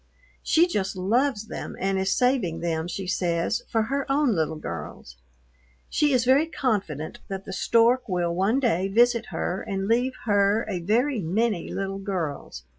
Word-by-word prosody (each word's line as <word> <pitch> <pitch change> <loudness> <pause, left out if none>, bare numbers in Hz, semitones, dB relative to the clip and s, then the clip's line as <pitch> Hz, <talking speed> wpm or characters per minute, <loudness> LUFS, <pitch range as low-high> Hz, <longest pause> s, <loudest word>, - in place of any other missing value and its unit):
She 330 +2 +4
just 200 - -2
loves 220 +5 +1
them - - -6
and 195 0 0
is 190 0 0
saving 250 -10 +1
them, 165 -1 -1
she 190 +2 -5
says, 175 +1 0
for 225 -1 +1
her 275 +4 -2
own 280 -3 +3
little 160 -3 -1
girls. 80 - -7 0.8
She 295 -1 +2
is 250 -3 +2
very 275 +5 +4
confident 200 - -2
that 195 0 -6
the 190 - -6
stork 235 +5 +3
will 175 -2 0
one 195 +9 +1
day 195 -8 +1
visit 235 +3 +3
her 185 - -3
and 195 -2 -3
leave 245 +4 +2
her 205 +1 +2
a 190 -4 -2
"very 230 +9 +1
many" 195 +2 -1
little 195 0 -3
girls. 165 - -4
200 Hz, 165 wpm, -25 LUFS, 180-240 Hz, 0.8 s, She